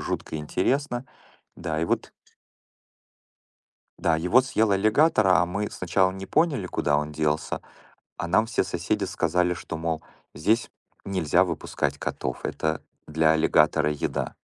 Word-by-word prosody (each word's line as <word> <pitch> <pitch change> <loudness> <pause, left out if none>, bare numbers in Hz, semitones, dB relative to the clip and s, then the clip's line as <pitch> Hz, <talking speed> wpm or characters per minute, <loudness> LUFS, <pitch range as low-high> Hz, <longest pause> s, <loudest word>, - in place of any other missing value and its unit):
жутко - - -4
интересно. 120 - -1 0.5
Да, 80 -2 -3
и - - +1
вот. - - -2 1.9
Да, 80 - +2
его 90 +10 +4
съел 110 -4 +1
аллигатор, 110 +4 +3
а 90 -1 +5
мы 100 +4 -3
сначала 95 +1 +1
не 95 0 -7
поняли, 145 - +1
куда 75 -4 +1
он 75 +1 -2
делся, 75 0 -1 0.6
а - - -2
нам 110 +6 +4
все 115 - 0
соседи 95 +3 -2
сказали, 90 0 +1
что: 80 -1 -6
"Мол, 80 -1 -2 0.3
здесь 110 +10 +1 0.4
нельзя 90 -1 +2
выпускать 85 -4 -2
котов. 65 -1 -4
Это 80 0 -2 0.3
для 80 0 +3
аллигатора 75 -1 +3
еда". 75 - -3
90 Hz, 135 wpm, -25 LUFS, 80-105 Hz, 1.9 s, а